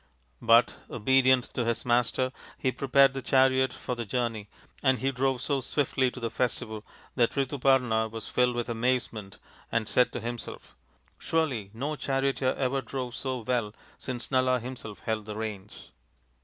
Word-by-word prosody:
But, 115 +1 +5
obedient 130 +2 +3
to 125 - 0
his 115 0 -1
master, 125 +1 +2 0.3
he 130 - 0
prepared 135 +1 +4
the 135 - -4
chariot 130 0 +3
for 125 - -5
the 120 -1 -3
journey, 115 -2 -2 0.3
and 130 -2 +3
he 135 +2 0
drove 130 -1 0
so 140 -2 0
swiftly 130 -1 +1
to 125 - -9
the 115 -2 -3
festival 110 -3 -2 0.3
that 120 -3 +2
Rituparna 130 -5 +2
was 110 0 -7
filled 125 -1 +2
with 120 -1 -2
amazement 115 -4 -1 0.3
and 115 -2 0
said 125 - +3
to - - -3
himself, 120 +1 -7 0.2
" 65 +4 -37
Surely 135 -11 -1
no 145 +6 -2
charioteer 135 -1 0
ever 135 0 0
drove 130 -3 -5
so 130 -1 -3
well 115 -2 -1 0.2
since 125 -2 -5
Nala 130 -1 +3
himself 120 -4 -8
held 110 -2 -3
the 105 - -5
reins." 105 -2 -7
125 Hz, 160 wpm, -28 LUFS, 115-130 Hz, 0.3 s, But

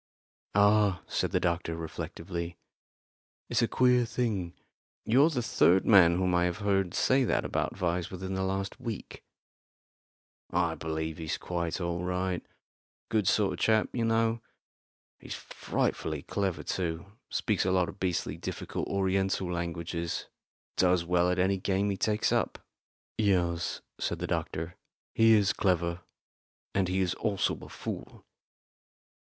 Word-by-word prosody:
"Ah," 100 -2 +4
said - - -1
the - - +1
doctor, 85 -1 -1
reflectively, 85 +1 -5 0.9
"it's - - +2
a 115 - +3
queer 125 0 +4
thing. 105 -7 -2 0.5
You're 135 +8 +5
the 130 -7 -1
third 95 -4 +4
man 90 -5 +7
whom 90 -1 +1
I 90 0 +3
have 90 +1 -1
heard 100 -3 0
say 130 +1 +3
that - - +1
about - - -1
Vyse 90 -2 -1
within 95 +1 -5
the 95 - -1
last 95 +1 -2
week." 115 -4 -6 1.3
"I 85 -2 +1
believe 80 0 -4
he's 80 -1 -2
quite 85 -1 -3
all 85 -1 -2
right 90 0 -1 0.7
good 105 -4 +1
sort 100 -2 +3
of 90 - -7
chap, 110 -1 +3
you 120 - 0
know. 115 0 +2 0.8
He's - - -7
frightfully - - -2
clever 95 -6 -2
too 85 -2 -2 0.2
speaks 105 -4 0
a 95 - +1
lot 90 -2 +3
of 95 - -9
beastly 90 -2 -1
difficult - - -4
Oriental 95 -1 0
languages 85 0 -3 0.5
does 90 -2 +3
well 90 0 +3
at 90 - +1
any 95 +2 +2
game 100 +2 0
he - - -1
takes 105 +1 +1
up." - - +1 0.6
"Yes," 90 -5 +1 0.2
said - - -1
the - - -3
doctor, 80 +2 -3 0.4
"he 115 0 +6
is 105 -3 +4
clever; 85 -2 0 0.7
and 95 -2 +2
he 95 +1 0
is 90 -1 +1
also 100 -2 0
a - - -10
fool." - - -7
95 Hz, 145 wpm, -29 LUFS, 85-100 Hz, 1.3 s, man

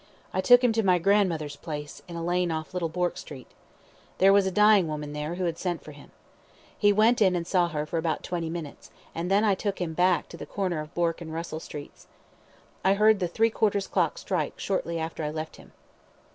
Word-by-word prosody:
I - - +1
took 245 0 +6
him 245 - +4
to 225 - +2
my 185 -3 +3
grandmother's 170 -6 +1
place, 150 -3 -7
in 170 - -8
a 165 0 -4
lane 175 0 +1
off 160 +1 -4
Little 175 -3 -1
Bourke 175 +2 -1
Street. 130 -4 -10 0.7
There 195 +1 +6
was 200 -1 +4
a - - -1
dying 210 -2 +5
woman 150 -1 -5
there, 150 +3 -4
who 185 - -3
had 165 -1 -2
sent 175 -3 -3
for 150 - -10
him. 145 -1 -14 0.7
He 205 -1 +4
went 220 +3 +3
in 190 -3 +4
and 170 -1 -2
saw 180 -1 +2
her 150 -3 -3
for 165 +2 -2
about 160 -1 -2
twenty 170 -2 -3
minutes, 165 -3 -7 0.2
and 170 +2 -3
then 200 +2 +3
I 210 -2 +4
took 195 +1 -3
him 170 -3 -2
back 180 +1 +2
to 170 - -10
the - - -8
corner 185 -5 -2
of 155 +1 -8
Bourke 170 0 0
and 160 -2 -7
Russell 160 -1 -5
Streets. 145 -2 -10 0.8
I 190 +1 +4
heard 215 0 +4
the 180 - 0
three 225 +6 +1
quarters 205 -3 0 0.3
strike - - -3
shortly 170 -3 -2
after 160 0 -4
I 150 - -1
left 155 +1 -6
him. - - -16
175 Hz, 220 wpm, -27 LUFS, 160-195 Hz, 0.8 s, took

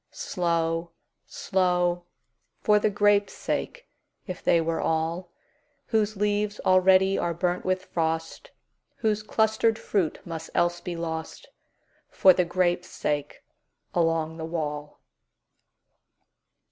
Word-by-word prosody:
Slow, 170 -1 -1 0.3
slow! 180 -2 0 0.5
For 210 0 +4
the 210 - +2
grapes' 205 0 +2
sake, - - -4 0.4
if 185 -3 -7
they 170 - +4
were 165 0 -1
all, 165 +2 -1 0.6
Whose 215 -2 +1
leaves 210 +1 0
already 185 +1 +4
are 170 -1 -1
burnt 180 +1 -1
with 185 0 0
frost, 165 - -3 0.5
Whose 215 -2 0
clustered 220 +1 +1
fruit 190 -9 -1
must 165 -1 -6
else 175 0 +1
be 175 -2 -5
lost—For 165 +3 -1
the 180 0 +1
grapes' 175 0 0
sake 145 -1 -3 0.5
along 165 -1 0
the 160 - -5
wall. 150 -3 -4
175 Hz, 110 wpm, -26 LUFS, 165-200 Hz, 0.6 s, For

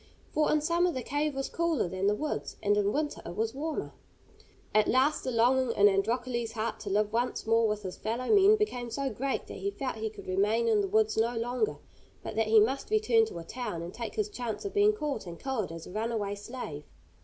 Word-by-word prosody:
For 305 - +2
in 305 - +3
summer 340 +3 +2
the 255 -5 -4
cave 290 +3 -1
was 270 0 -2
cooler 335 - 0
than 185 +2 -1
the 205 - +3
woods, 300 +6 -4
and 205 0 +3
in 205 0 +2
winter 295 +3 -2
it 170 - -7
was 225 +2 -1
warmer. 305 +3 -4 0.8
At 215 0 +4
last 270 +4 +2
the - - -2
longing 250 +1 +3
in 205 - +7
Androcles' 235 +3 0
heart 225 0 -3
to 205 - -6
live 210 +2 +1
once 240 +2 -1
more 225 0 +4
with 210 -1 -2
his 185 -2 -6
fellow 230 +4 -3
men 405 +1 +7
became 250 - -2
so 270 +4 -2
great 265 +5 -2
that - - -8
he 400 - -1
felt 270 - -4
he 220 0 -2
could 215 - -12
remain 210 +5 +1
in 215 -2 +4
the 200 - -1
woods 215 +2 +2
no 230 +2 +1
longer, 245 - -1 0.5
but - - -6
that 225 0 +1
he 220 0 +7
must 260 +6 +1
return 435 +1 +4
to - - -8
a 170 - -6
town, 175 -4 -5
and 175 - -7
take 235 -2 -6
his 425 -2 0
chance 245 - -5
of 395 - -4
being 415 +1 +5
caught 295 - -3
and 170 -1 -8
killed 255 -10 -2
as 165 -1 -8
a - - -10
runaway 215 -1 -2
slave. 205 - -7
230 Hz, 230 wpm, -29 LUFS, 210-280 Hz, 0.8 s, in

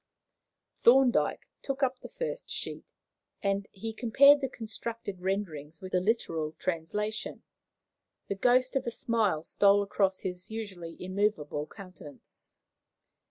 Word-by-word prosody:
Thorndyke 250 +1 +4
took 275 0 -2
up 260 -1 +1
the - - -10
first - - -5
sheet, - - -5 0.5
and 200 0 +1
as - - -46
he 220 +3 -6
compared 280 +6 +6
the 270 - -1
constructed 225 -4 -5
renderings 165 -6 -3
with 185 0 -8
the 180 - +3
literal 165 -7 0
translation, 205 +7 -3 0.8
the - - -1
ghost 250 +6 +3
of 270 - 0
a - - +3
smile 225 -9 0
stole 200 +3 +4
across 195 -1 0
his 180 -1 -5
usually 190 -7 -6
immovable 185 -6 -1
countenance. 180 -9 -13
205 Hz, 125 wpm, -30 LUFS, 180-235 Hz, 0.8 s, compared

